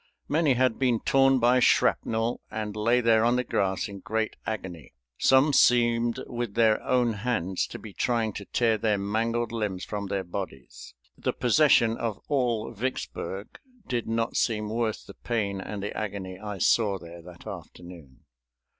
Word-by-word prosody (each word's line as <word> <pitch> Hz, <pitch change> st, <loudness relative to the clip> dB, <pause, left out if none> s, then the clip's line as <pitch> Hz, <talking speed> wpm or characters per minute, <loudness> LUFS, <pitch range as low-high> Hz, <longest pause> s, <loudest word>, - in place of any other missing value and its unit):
Many 150 Hz, -2 st, +2 dB
had 130 Hz, -2 st, +1 dB
been 125 Hz, -4 st, +2 dB
torn 135 Hz, -2 st, +4 dB
by 125 Hz, +1 st, +4 dB
shrapnel 115 Hz, -1 st, +2 dB
and 105 Hz, -1 st, -4 dB
lay 115 Hz, +3 st, +2 dB
there 115 Hz, -1 st, +4 dB
on 120 Hz, +1 st, +3 dB
the 125 Hz, -, +1 dB
grass 95 Hz, -5 st, -1 dB
in 100 Hz, -1 st, -9 dB
great 110 Hz, +1 st, -2 dB
agony. 95 Hz, -, -6 dB, 0.2 s
Some 135 Hz, +3 st, +4 dB
seemed 120 Hz, -2 st, +3 dB
with 120 Hz, -4 st, -5 dB
their 110 Hz, -2 st, +3 dB
own 125 Hz, -2 st, +1 dB
hands 105 Hz, -5 st, -1 dB
to -, -, -8 dB
be 105 Hz, -3 st, -11 dB
trying 115 Hz, -2 st, 0 dB
to 100 Hz, -, -7 dB
tear 115 Hz, -1 st, +1 dB
their 105 Hz, -1 st, +1 dB
mangled 115 Hz, +4 st, -1 dB
limbs 105 Hz, -5 st, -3 dB
from 100 Hz, -1 st, -4 dB
their 95 Hz, 0 st, -2 dB
bodies. 85 Hz, -7 st, -8 dB, 0.2 s
The -, -, -2 dB
possession 120 Hz, -3 st, +4 dB
of 115 Hz, -3 st, -3 dB
all 120 Hz, -6 st, 0 dB
Vicksburg 110 Hz, -4 st, -5 dB, 0.3 s
did 120 Hz, -2 st, -2 dB
not 115 Hz, +1 st, -1 dB
seem 105 Hz, -2 st, 0 dB
worth 115 Hz, -1 st, -2 dB
the -, -, -11 dB
pain 100 Hz, -5 st, -2 dB
and 100 Hz, 0 st, -6 dB
the 105 Hz, -, -4 dB
agony 95 Hz, -3 st, -5 dB
I 105 Hz, -1 st, -6 dB
saw 100 Hz, +1 st, +2 dB
there 85 Hz, -1 st, -11 dB
that 90 Hz, 0 st, -14 dB
afternoon. 85 Hz, -7 st, -10 dB
110 Hz, 165 wpm, -27 LUFS, 100-120 Hz, 0.3 s, torn